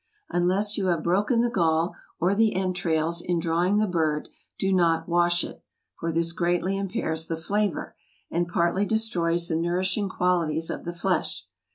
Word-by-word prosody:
Unless 190 +4 +1
you 190 - 0
have 170 -3 +1
broken 205 +7 +2
the 240 - +2
gall, 165 -4 +1 0.3
or 180 +3 +2
the 220 0 +2
entrails, 170 -3 0
in 175 0 -1
drawing 175 +4 +1
the 215 - +3
bird, 160 -5 0 0.3
do 195 0 +1
not 170 -3 +2
wash 175 0 +3
it, - - -8 0.4
for 165 - -2
this 165 +1 +1
greatly 175 +2 0
impairs 165 -5 -2
the 165 - -2
flavor, 200 +2 -1 0.4
and 175 +1 0
partly 175 +2 +1
destroys 175 -6 +1
the 160 - -1
nourishing 185 +4 0
qualities 165 -4 0
of - - -6
the 170 - -4
flesh. 175 - -1
175 Hz, 165 wpm, -26 LUFS, 165-190 Hz, 0.4 s, the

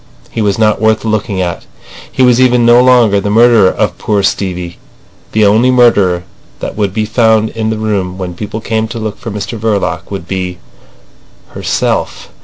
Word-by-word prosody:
He 115 - -3
was 100 -2 0
not 110 -1 +1
worth 110 0 +1
looking 105 -3 -1
at. 85 -2 -4 0.4
He 130 - +1
was 125 0 +4
even 125 -2 +3
no 120 +1 +6
longer 120 -5 +4
the 100 - -2
murderer 115 -2 +5
of 100 -4 -2
poor 105 -2 0
Stevie. 90 -3 -3 0.5
The 110 -1 +2
only 110 +5 +3
murderer 105 -8 +3 0.4
that - - -5
would 100 -2 -1
be 110 +2 -2
found 110 -1 +2
in 110 -1 -3
the 110 - -2
room 100 -4 -2
when 90 -2 -5
people 105 +4 -6
came 110 0 -2
to 115 - -7
look 110 -2 -5
for 115 - -7
Mr 105 +2 -5
Verloc 95 -6 -2
would 95 -4 -6
be—herself! 90 -9 -5
105 Hz, 175 wpm, -12 LUFS, 95-115 Hz, 0.5 s, no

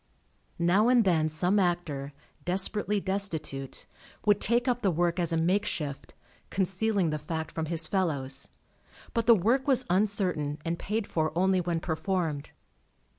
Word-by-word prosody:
Now 180 +6 +3
and 250 -2 +5
then 160 -5 +2
some 180 +6 +1
actor, 170 -6 -1 0.3
desperately 200 +3 0
destitute, 165 -9 -3 0.4
would 205 -1 +4
take 240 +4 +2
up 245 -1 +1
the 195 - +2
work 175 +1 +1
as 170 -2 0
a 165 - +1
makeshift, 165 -4 -1 0.3
concealing 190 -1 0
the 155 - -2
fact 160 +1 -4
from 160 -1 -3
his 165 0 0
fellows, 140 -8 -1 0.7
but 230 -2 0
the 235 - +9
work 235 +8 +1
was 260 -2 +3
uncertain 180 -7 +1
and 170 0 -2
paid 215 +1 -2
for 155 -4 -1
only 185 0 +3
when 170 -1 -1
performed. 165 -3 -2
180 Hz, 145 wpm, -28 LUFS, 160-205 Hz, 0.7 s, the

